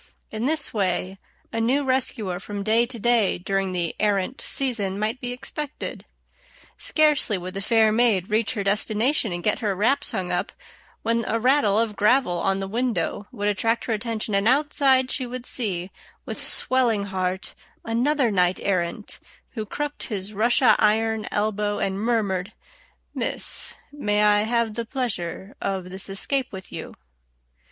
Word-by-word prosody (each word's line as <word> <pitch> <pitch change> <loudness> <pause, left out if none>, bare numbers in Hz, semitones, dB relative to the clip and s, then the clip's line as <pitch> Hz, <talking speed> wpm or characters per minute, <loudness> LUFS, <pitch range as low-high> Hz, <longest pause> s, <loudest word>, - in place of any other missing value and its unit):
] - - -44
In 220 +2 -3
this 300 0 +1
way 190 -2 -1 0.3
a 225 - 0
new 265 +5 +2
rescuer 230 -8 -1
from 200 +1 -5
day 225 +3 +3
to 245 -1 -4
day 230 -2 +2
during 195 +1 -1
the 175 -2 -2
"errant" 205 +3 0
season 220 -8 +1
might 215 +4 -2
be 245 - -3
expected. 280 +3 -6 0.7
Scarcely 300 -9 +2
would 185 +1 -6
the 195 - -4
fair 220 +1 +4
maid 215 -5 +3
reach 220 +3 +1
her 205 - -1
destination 215 +4 +1
and 175 0 -4
get 210 - +2
her 205 -4 -1
wraps 225 +9 +2
hung 180 -1 -3
up, 180 +7 -1 0.5
when 230 0 +1
a 230 - 0
rattle 245 -4 +3
of 225 -2 +1
gravel 210 -5 +3
on 195 +2 +1
the 195 0 -3
window 225 -2 -1
would 205 -5 -3
attract 225 +3 +1
her 230 - 0
attention, 220 -1 -3
and 200 +2 +2
outside 270 -1 +3
she 255 -3 -1
would 250 0 -6
see, 190 -8 -2 0.3
with - - -4
swelling 240 -5 +1
heart, 185 -1 -3 0.3
another 245 +2 +1
knight 180 -2 +2
errant, 185 +1 -2 0.3
who 220 -4 -5
crooked 295 +5 -3
his 205 -1 -3
Russia 225 +1 +4
iron 220 0 +2
elbow 210 0 -1
and 195 0 -1
murmured, 210 -4 0 0.6
"Miss, - - -3 0.2
may 210 -8 0
I 210 0 +5
have 230 -1 0
the 235 +2 -3
pleasure 200 -7 -4
of 190 -2 -3
this 190 +1 -3
escape 260 +7 0
with 190 -2 -9
you?" - - -7
215 Hz, 160 wpm, -24 LUFS, 195-245 Hz, 0.7 s, I